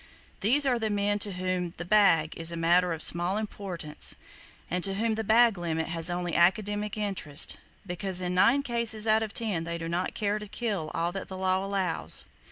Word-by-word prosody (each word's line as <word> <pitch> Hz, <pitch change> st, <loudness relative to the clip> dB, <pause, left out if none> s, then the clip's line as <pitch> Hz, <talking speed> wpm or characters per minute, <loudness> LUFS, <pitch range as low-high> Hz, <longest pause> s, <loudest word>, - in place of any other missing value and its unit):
These 270 Hz, +8 st, +4 dB
are 250 Hz, -3 st, +2 dB
the 220 Hz, -1 st, -1 dB
men 205 Hz, 0 st, 0 dB
to 200 Hz, -1 st, 0 dB
whom 180 Hz, -1 st, -2 dB
"the 175 Hz, -, -6 dB
bag" 175 Hz, -6 st, +3 dB
is 165 Hz, 0 st, 0 dB
a 170 Hz, -, -5 dB
matter 175 Hz, +2 st, +3 dB
of 160 Hz, -1 st, +1 dB
small 175 Hz, +3 st, +2 dB
importance, 190 Hz, -7 st, -2 dB, 0.5 s
and 180 Hz, 0 st, -2 dB
to 195 Hz, -1 st, +2 dB
whom 225 Hz, +2 st, 0 dB
"the 220 Hz, 0 st, -2 dB
bag 225 Hz, -1 st, +4 dB
limit" 160 Hz, -2 st, -2 dB
has 165 Hz, 0 st, 0 dB
only 175 Hz, -1 st, -3 dB
academic 205 Hz, +4 st, +1 dB
interest; 195 Hz, -9 st, -1 dB, 0.3 s
because 185 Hz, 0 st, -2 dB
in 180 Hz, 0 st, -1 dB
nine 240 Hz, +10 st, +4 dB
cases 235 Hz, -4 st, -1 dB
out 220 Hz, 0 st, +3 dB
of 220 Hz, -2 st, -3 dB
ten 205 Hz, -8 st, -1 dB
they 170 Hz, 0 st, -4 dB
do 165 Hz, 0 st, -5 dB
not 175 Hz, +2 st, -2 dB
care 210 Hz, 0 st, -1 dB
to 210 Hz, -, -8 dB
kill 200 Hz, -7 st, -3 dB
all 170 Hz, +1 st, 0 dB
that 195 Hz, +1 st, -6 dB
the 190 Hz, -, -7 dB
law 185 Hz, 0 st, 0 dB
allows. 195 Hz, -3 st, -1 dB
190 Hz, 200 wpm, -28 LUFS, 175-215 Hz, 0.5 s, These